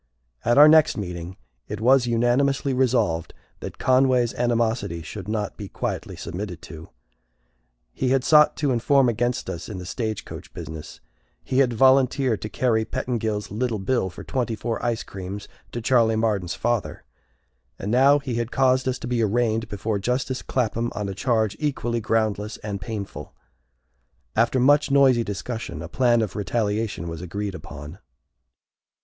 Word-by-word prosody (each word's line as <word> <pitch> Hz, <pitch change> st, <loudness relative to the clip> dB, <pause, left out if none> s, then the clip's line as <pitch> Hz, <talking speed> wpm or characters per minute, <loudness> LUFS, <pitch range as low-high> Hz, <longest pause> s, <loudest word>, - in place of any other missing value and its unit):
At 120 Hz, +2 st, +2 dB
our 150 Hz, +1 st, +10 dB
next 155 Hz, 0 st, +5 dB
meeting 90 Hz, -2 st, -6 dB, 0.3 s
it 105 Hz, -, -5 dB
was 125 Hz, +2 st, +4 dB
unanimously 130 Hz, +4 st, +1 dB
resolved 120 Hz, -11 st, +1 dB, 0.2 s
that -, -, -7 dB
Conway's 130 Hz, -2 st, +3 dB
animosity 115 Hz, -8 st, 0 dB
should 95 Hz, +4 st, -8 dB
not 105 Hz, -2 st, -3 dB
be 100 Hz, -2 st, -7 dB
quietly -, -, -4 dB
submitted 90 Hz, -1 st, -6 dB
to. 80 Hz, -1 st, -10 dB, 1.0 s
He 130 Hz, -, -1 dB
had 130 Hz, 0 st, +2 dB
sought 150 Hz, +1 st, +5 dB
to 145 Hz, -3 st, +1 dB
inform 130 Hz, +2 st, +3 dB
against 120 Hz, +2 st, -1 dB
us 85 Hz, -, -6 dB
in 105 Hz, -, -6 dB
the 90 Hz, -, -7 dB
stagecoach 110 Hz, +2 st, -5 dB
business; 80 Hz, -1 st, -8 dB, 0.4 s
he 130 Hz, -, 0 dB
had 130 Hz, -3 st, +3 dB
volunteered 130 Hz, -1 st, +3 dB
to 105 Hz, -, -5 dB
carry 115 Hz, -3 st, +1 dB
Pettingil's 110 Hz, -3 st, -3 dB
"little 115 Hz, +1 st, -1 dB
bill" 95 Hz, 0 st, 0 dB
for -, -, -10 dB
twenty 120 Hz, -3 st, -2 dB
four 115 Hz, +1 st, -4 dB
icecreams 100 Hz, -4 st, -4 dB, 0.2 s
to 120 Hz, -, -4 dB
Charley 115 Hz, -2 st, +3 dB
Marden's 105 Hz, -6 st, 0 dB
father; 120 Hz, -3 st, -2 dB, 0.7 s
and 100 Hz, -, -4 dB
now 135 Hz, +4 st, +5 dB
he 140 Hz, -3 st, -4 dB
had 120 Hz, 0 st, -2 dB
caused 130 Hz, 0 st, +2 dB
us 130 Hz, 0 st, 0 dB
to -, -, -7 dB
be 120 Hz, -1 st, 0 dB
arraigned 115 Hz, +1 st, +1 dB
before 105 Hz, +1 st, -2 dB
justice 125 Hz, +4 st, -1 dB
Clapham 120 Hz, -1 st, -1 dB
on 105 Hz, -1 st, -3 dB
a -, -, -4 dB
charge 110 Hz, -1 st, 0 dB
equally 120 Hz, -5 st, -1 dB
groundless 110 Hz, -1 st, -1 dB
and 100 Hz, -2 st, -4 dB
painful. 100 Hz, 0 st, -6 dB, 1.0 s
After 115 Hz, +3 st, +2 dB
much 145 Hz, +4 st, +4 dB
noisy 135 Hz, -4 st, +5 dB
discussion, 110 Hz, +3 st, -5 dB
a -, -, -6 dB
plan 120 Hz, -3 st, +2 dB
of 105 Hz, -, -5 dB
retaliation 105 Hz, -2 st, -1 dB
was 85 Hz, 0 st, -6 dB
agreed 100 Hz, +3 st, -4 dB
upon. 75 Hz, 0 st, -9 dB
115 Hz, 155 wpm, -24 LUFS, 105-125 Hz, 1.0 s, our